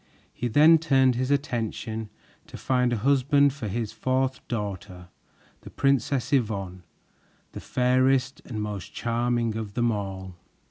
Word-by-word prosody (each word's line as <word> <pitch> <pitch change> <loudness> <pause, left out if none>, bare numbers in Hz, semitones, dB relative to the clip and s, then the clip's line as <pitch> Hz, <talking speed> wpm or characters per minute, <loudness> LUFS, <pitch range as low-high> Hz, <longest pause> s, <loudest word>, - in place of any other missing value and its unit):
He 120 - -3
then 155 +7 +6
turned 135 -5 +3
his 130 +2 -2
attention 115 -5 -2 0.4
to - - -10
find 125 -1 +1
a 120 - 0
husband 140 +3 +3
for 130 -6 -6
his 110 +1 -3
fourth 130 0 -1
daughter, 100 -5 -5 0.5
the - - -11
Princess 140 0 0
Yvonne, 100 -8 -1 0.7
the - - -8
fairest 130 +1 +1
and 110 -4 -5
most 105 -3 -6
charming 120 -1 -1
of 110 -3 -5
them 120 -1 +2
all. 95 -3 -5
120 Hz, 135 wpm, -26 LUFS, 105-135 Hz, 0.7 s, then